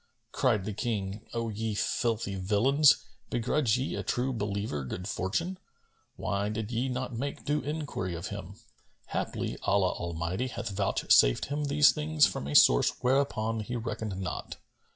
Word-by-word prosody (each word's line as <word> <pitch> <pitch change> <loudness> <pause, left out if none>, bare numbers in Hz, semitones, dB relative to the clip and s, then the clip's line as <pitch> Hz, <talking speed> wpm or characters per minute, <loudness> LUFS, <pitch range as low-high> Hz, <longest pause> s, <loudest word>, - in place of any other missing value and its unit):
Cried 110 -8 +1
the 105 - -3
King, 105 -3 -3
"O 115 -1 -2
ye 110 0 -3
filthy 110 -1 0
villains, 115 +10 +4 0.2
begrudge 120 0 +1
ye 130 +2 -2
a - - -2
True 130 +1 -1
Believer 100 - -2
good 90 +8 -5
fortune? 165 - -2 0.6
Why 100 +1 -1
did 110 +1 -4
ye 125 +3 0
not 125 -1 -3
make 140 +5 -4
due 150 +1 +1
enquiry 145 - -3
of 85 +3 -5
him? 100 -1 -7 0.5
Haply - - -3
Allah 100 -2 +2
Almighty 85 +7 -3
hath 120 - -5
vouchsafed 95 -10 +3
him 145 +1 -2
these 145 +1 +5
things 155 0 +3
from 70 - -3
a 75 - -3
source - - +6
whereupon 125 -4 +1
he 115 +3 -4
reckoned 110 -4 -4
not. 95 - -5
110 Hz, 150 wpm, -29 LUFS, 100-130 Hz, 0.6 s, source